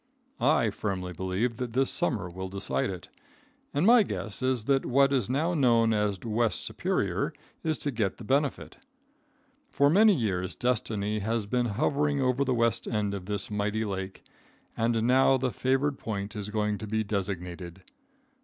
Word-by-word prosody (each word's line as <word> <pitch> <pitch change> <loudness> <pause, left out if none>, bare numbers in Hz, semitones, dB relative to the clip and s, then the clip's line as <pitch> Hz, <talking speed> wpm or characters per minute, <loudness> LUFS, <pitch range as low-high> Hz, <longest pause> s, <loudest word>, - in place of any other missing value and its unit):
I - - +3
firmly 90 -3 -3
believe 95 +7 -2
that 125 -2 -4
this 135 +2 +2
summer 120 - -1
will 95 +2 -6
decide 100 +1 -2
it, 90 -2 -7 0.6
and 150 - +1
my 235 +2 +7
guess 120 - -3
is 130 -3 0
that 135 +3 +2
what 140 +2 +3
is 125 -5 +1
now 155 +7 +1
known 115 -7 +3
as 105 -2 0
West 115 0 0
Superior - - -1 0.3
is 160 -1 0
to 145 - -2
get 110 -6 -1
the - - -10
benefit. 140 +5 -1 0.9
For 140 +1 +3
many 210 +3 +6
years 95 - -2
destiny 110 -4 -1
has 110 +1 -1
been 125 +3 0
hovering 145 0 +1
over 130 +1 +2
the 130 -2 0
west 115 -1 +1
end 105 -3 -1
of 95 -2 -6
this 105 0 -3
mighty 105 +2 -1
lake, 95 -1 -5 0.5
and 115 0 +1
now 130 +2 +4
the 130 0 -1
favored 135 +3 0
point 105 0 -4
is 105 -1 -5
going 105 -1 -1
to 110 - -6
be 110 +1 0
designated. 90 -3 -4
115 Hz, 165 wpm, -28 LUFS, 100-130 Hz, 0.9 s, my